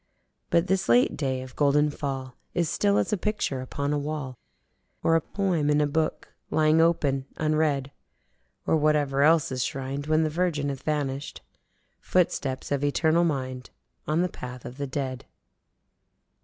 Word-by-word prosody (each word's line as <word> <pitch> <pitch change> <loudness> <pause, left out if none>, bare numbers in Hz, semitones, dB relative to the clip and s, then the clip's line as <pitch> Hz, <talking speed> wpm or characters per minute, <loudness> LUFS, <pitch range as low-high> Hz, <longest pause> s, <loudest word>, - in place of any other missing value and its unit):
But 170 +1 +3
this 190 -4 0
late 120 +1 +4
day 130 -3 -2
of 130 -1 -12
golden 150 +1 +3
fall 135 -3 -4 0.2
is 170 -2 +1
still 200 0 +2
as - - +1
a - - +2
picture 185 -9 -1
upon 140 +2 -2
a 145 - +1
wall 145 -3 -4 0.7
or 165 - +4
a 165 - +3
poem 175 -5 0
in 150 0 +3
a 150 - +3
book 155 +2 -2 0.2
lying 155 +1 +4
open 140 -5 +1
unread. 155 -3 +1 0.7
Or - - +3
whatever 145 -2 +2
else 155 0 +4
is 130 -1 -1
shrined 135 +2 -4
when 155 +1 +3
the 155 - +1
Virgin 155 -4 0
hath 135 -2 -5
vanishèd: 145 -2 -2 0.6
Footsteps 140 -8 0
of 140 0 0
eternal 160 +3 +3
Mind 130 -5 -2 0.4
on 155 +3 +2
the - - +1
path 125 -7 -9
of 125 - -8
the 140 -1 -3
dead. 130 -1 -4
145 Hz, 160 wpm, -26 LUFS, 135-160 Hz, 0.7 s, late